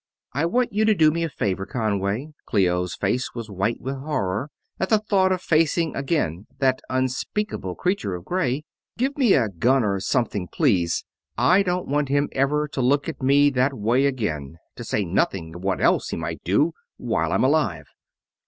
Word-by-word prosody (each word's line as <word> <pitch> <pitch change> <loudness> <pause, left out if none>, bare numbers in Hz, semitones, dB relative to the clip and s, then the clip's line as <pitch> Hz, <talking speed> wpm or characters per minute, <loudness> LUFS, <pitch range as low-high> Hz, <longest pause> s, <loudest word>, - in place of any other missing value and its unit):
"I 145 +5 +1
want 245 +4 0
you 215 +1 +2
to 215 -1 +4
do 155 -3 +5
me 165 +2 -1
a 165 - -1
favor, 95 -7 -2
Conway." 105 +3 -1 0.2
Clio's 90 -3 +1
face 120 +6 -1
was 115 -3 -6
white 100 +4 -1
with 135 +2 -4
horror 130 -4 -2 0.3
at 190 - -1
the 220 - +5
thought 195 -3 +2
of 185 -1 -1
facing 160 0 +2
again 135 - -1
that 130 -1 +1
unspeakable 130 - -2
creature 180 - -1
of 90 0 -9
gray. 150 -6 -1 0.3
"Give 265 +4 0
me 255 -8 +4
a 120 -5 +3
gun 120 +8 +2
or 100 -2 0
something, 100 -2 -1
please. 95 - +1 0.3
I 185 +2 +5
don't 180 -2 -1
want 145 0 0
him 145 +1 +1
ever 150 +3 +1
to 140 - -3
look 140 +3 +2
at 160 - -5
me 140 +2 +4
that 130 +1 +1
way 120 +6 +2
again, 80 - -3 0.2
to - - -7
say 105 - -1
nothing 85 -1 -1
of 90 +2 -9
what 95 -1 0
else - - +2
he - - -3
might - - -5
do, 145 - +2 0.2
while - - -1
I'm - - +2
alive." - - +1
130 Hz, 185 wpm, -23 LUFS, 100-155 Hz, 0.3 s, do